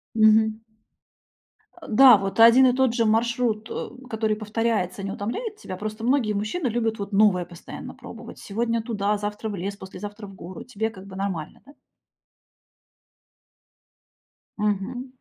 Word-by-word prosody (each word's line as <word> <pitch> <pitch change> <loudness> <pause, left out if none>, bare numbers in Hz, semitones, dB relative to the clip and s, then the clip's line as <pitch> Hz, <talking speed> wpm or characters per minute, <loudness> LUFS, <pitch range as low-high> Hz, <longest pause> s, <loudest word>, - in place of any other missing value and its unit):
Мгм. 220 0 +4 1.2
Э, - - -10
да, 245 0 +8
вот 195 +3 -4
один 240 +3 +8
и 250 - +3
тот 260 -3 +2
же 230 -2 +1
маршрут, 225 0 +1
э, - - -4 0.2
который 220 -1 0
повторяется, 215 -3 -1
не 195 - -3
утомляет 415 - -4
тебя? 185 - -7
Просто 215 +2 -5
многие 245 -4 +2
мужчины 215 - -2
любят 225 -2 -1
вот 200 +1 -5
новое 195 -3 +4
постоянно 175 -1 -9
пробовать. - - -11
Сегодня 230 +2 -1
туда, 210 -2 -1
завтра 210 +1 -4
в 205 - -4
лес, 195 +2 -4
послезавтра 205 +2 -9
в 195 - -12
гору. 180 +1 -9
Тебе 220 -2 -3
как 195 -4 -12
бы 190 -1 -10
нормально, 190 -5 -4
да? 285 - -16 2.8
Мгм. 210 +5 -2
215 Hz, 145 wpm, -24 LUFS, 200-230 Hz, 2.8 s, да